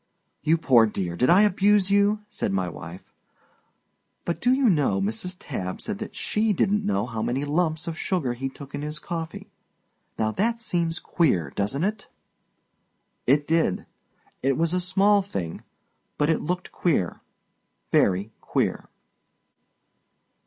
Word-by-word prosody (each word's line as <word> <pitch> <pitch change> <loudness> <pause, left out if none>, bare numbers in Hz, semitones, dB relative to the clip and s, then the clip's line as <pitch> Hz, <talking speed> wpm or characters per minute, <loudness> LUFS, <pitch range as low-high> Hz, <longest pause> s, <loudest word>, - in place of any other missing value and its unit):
"You 160 +2 +3
poor 125 -8 +5
dear, 90 -5 -3
did 125 +8 +2
I 185 +4 +7
abuse 200 -1 +3
you?" 205 +1 +3
said - - -2
my 95 -2 0
wife. 85 +2 -9 1.1
"But, 170 - -2
do 245 - +3
you 260 0 +3
know, 145 - +2
Mrs. 110 - -2
Tabb 95 - -5
said 215 -2 -4
that 215 - -7
she 215 0 +1
didn't 205 +3 +1
know 100 +1 0
how 115 -3 -4
many 135 +5 -1
lumps 160 +2 0
of 165 0 -4
sugar 165 -11 0
he 135 +2 -4
took 135 +1 -12
in 145 - -4
his 150 +1 -4
coffee. 165 0 -6 0.7
Now 110 -1 +1
that 230 - 0
seems 170 -6 -1
queer, 140 - +1
doesn't 105 +10 -1
it?" 210 +1 -2 1.2
It 145 +3 +4
did. 160 - +1 0.6
It 135 0 +1
was 165 +1 +1
a 180 - +1
small 195 +3 +3
thing. 95 - -5 0.6
But 150 +2 +2
it 160 - 0
looked 180 +3 -3
queer, 140 - 0 0.7
Very 100 +3 +2
queer. - - -1
160 Hz, 145 wpm, -25 LUFS, -, 1.2 s, I